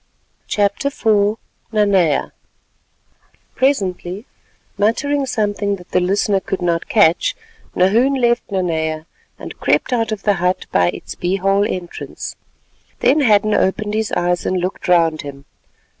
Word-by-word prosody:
CHAPTER 205 +5 0
IV 215 -5 +1 0.3
NANEA 195 -8 +2 1.2
Presently, 195 -6 -1 0.5
muttering 270 +7 0
something 205 -3 -1
that 180 -2 -15
the - - +3
listener 195 +2 +1
could 190 0 -4
not 170 -1 -1
catch, 175 -6 +3 0.4
Nahoon 230 +9 +3
left 240 -1 +1
Nanea, 160 -5 -2 0.3
and - - -9
crept - - +1
out 225 -2 0
of 215 -2 -4
the 205 - +3
hut 180 +1 0
by 90 -1 +3
its - - -7
bee 180 +2 -1
hole 195 +1 +2
entrance. 180 -2 -6 0.7
Then 280 +4 +4
Hadden 215 -4 +3
opened 210 +2 0
his 220 0 -1
eyes 175 0 0
and 185 - -1
looked 180 +2 -3
round 165 -3 +3
him. 140 -1 -10
200 Hz, 130 wpm, -18 LUFS, 180-215 Hz, 1.2 s, Then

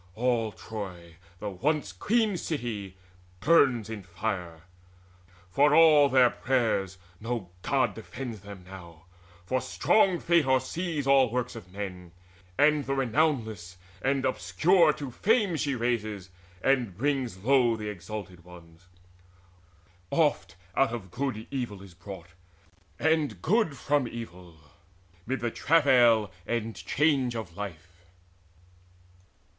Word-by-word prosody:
All 115 -2 0
Troy, 90 -7 -8 0.2
the 105 +2 -5
once 145 - -1
queen 215 - +1
city, 115 - -4 0.4
burns 130 - +4
in 110 -2 -6
fire: 90 -3 -4 0.9
For 145 +5 +4
all 155 -3 +7
their 130 -2 +5
prayers, 110 -7 0 0.2
no 115 -5 -4
God - - +1
defends 125 -5 -7
them 100 -1 -11
now; 85 -3 -12 0.4
For 130 +7 0
strong 185 - +2
Fate 170 -4 +2
oversees 145 +4 0
all 135 -2 +5
works 125 +1 -3
of 95 -5 -11
men, 90 -3 -7 0.4
And 150 -1 +3
the 135 - 0
renownless 115 - 0 0.3
and 135 0 0
obscure 155 - +3
to 140 -4 -7
fame 210 - +2
She 145 -3 -1
raises, 110 -6 -2 0.3
and 125 -9 +1
brings 135 -5 -1
low 120 +2 +3
the 105 -1 -5
exalted 95 -2 -8
ones. 85 0 -16 1.2
Oft 155 - +1 0.2
out 135 -3 +3
of 100 -7 -6
good 130 +1 -2
is 110 - -8
evil 120 -7 -4 0.2
brought, 95 -4 -9 0.7
and 155 - +1
good 175 - +1
From 145 -3 +1
evil, 90 -8 -9 0.7
mid 130 -1 -2
the 120 -1 -1
travail 125 - +4 0.2
and 115 -1 -2
change 140 -5 +1
of 100 -7 -6
life." 90 -3 -8
120 Hz, 120 wpm, -28 LUFS, 95-140 Hz, 1.2 s, all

